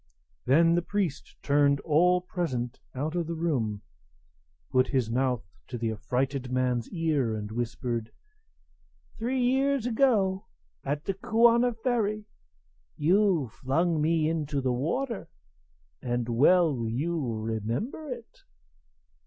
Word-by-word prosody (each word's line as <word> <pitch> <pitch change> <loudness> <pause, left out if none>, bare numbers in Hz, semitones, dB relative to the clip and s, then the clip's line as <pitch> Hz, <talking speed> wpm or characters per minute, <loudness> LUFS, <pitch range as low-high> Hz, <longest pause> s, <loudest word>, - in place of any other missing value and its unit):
Then 165 +5 +5
the 175 - +2
priest 180 -5 -3
turned 140 0 +3
all 180 +3 +3
present 145 -10 -3 0.2
out 150 +5 -2
of 175 -2 -1
the 170 - -3
room, 120 -11 -1 0.9
put 130 0 +3
his 125 -5 0
mouth 125 -2 0 0.2
to 120 - -5
the 115 -1 -1
affrighted 130 +3 -2
man's 125 -2 0
ear, 150 - 0
and 105 0 -5
whispered: 115 0 -3 1.1
"Three 250 +3 -1
years 265 +1 +2
ago, 220 -6 +2 0.4
at 145 +2 -3
the 195 - 0
Kuana 235 +4 +3
ferry, 215 -4 0 0.7
you 180 -3 +3
flung 155 +7 0
me 160 0 +2
into 150 -3 -1
the 130 -2 0
water; 205 - -2 0.7
and 120 -1 -2
well 140 0 +3
you 155 +7 -1
remember 115 - -3
it." 240 -2 -8
155 Hz, 120 wpm, -28 LUFS, 125-190 Hz, 1.1 s, Then